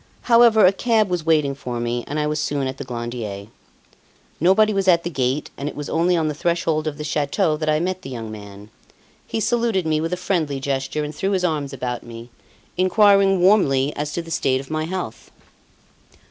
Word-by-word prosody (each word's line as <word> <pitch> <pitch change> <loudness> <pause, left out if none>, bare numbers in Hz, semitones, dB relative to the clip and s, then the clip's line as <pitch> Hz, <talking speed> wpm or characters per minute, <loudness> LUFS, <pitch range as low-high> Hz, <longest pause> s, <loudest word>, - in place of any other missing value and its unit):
However, 230 -3 +5
a 185 - +5
cab 220 -1 +1
was 175 -3 -2
waiting 150 -4 +3
for 125 -3 -5
me 120 0 -2
and 150 +2 -3
I 150 - 0
was 150 0 -1
soon 145 -2 -1
at 130 0 -4
the 140 - -5
Glandier. 120 -5 -5 0.9
Nobody 210 +6 +4
was 195 -1 -1
at 170 -2 +4
the 175 - -4
gate, 135 0 -1
and 140 +1 -3
it - - -10
was 150 - -6
only 175 +2 +2
on 160 -1 0
the 150 - -1
threshold 160 -1 -1
of 150 -2 -3
the 150 - -5
chateau 155 +3 0
that 155 0 -2
I 155 0 +2
met 185 +2 -2
the 185 - -8
young 115 -4 -6
man. 100 0 -11 0.6
He - - -2
saluted 230 -5 0
me 155 -1 +1
with 165 +1 -2
a 180 - -1
friendly 165 -6 -1
gesture 135 +2 -2
and 150 +1 -5
threw 195 +6 -1
his 185 -1 +1
arms 150 -5 -1
about 125 -2 -4
me, 115 0 -11 0.5
inquiring 195 0 +4
warmly 150 -8 +3
as 150 0 -3
to 170 - -3
the 165 - -11
state 130 -4 +1
of 135 +2 -10
my 155 0 -1
health. 175 -10 -6
155 Hz, 210 wpm, -21 LUFS, 135-185 Hz, 0.9 s, However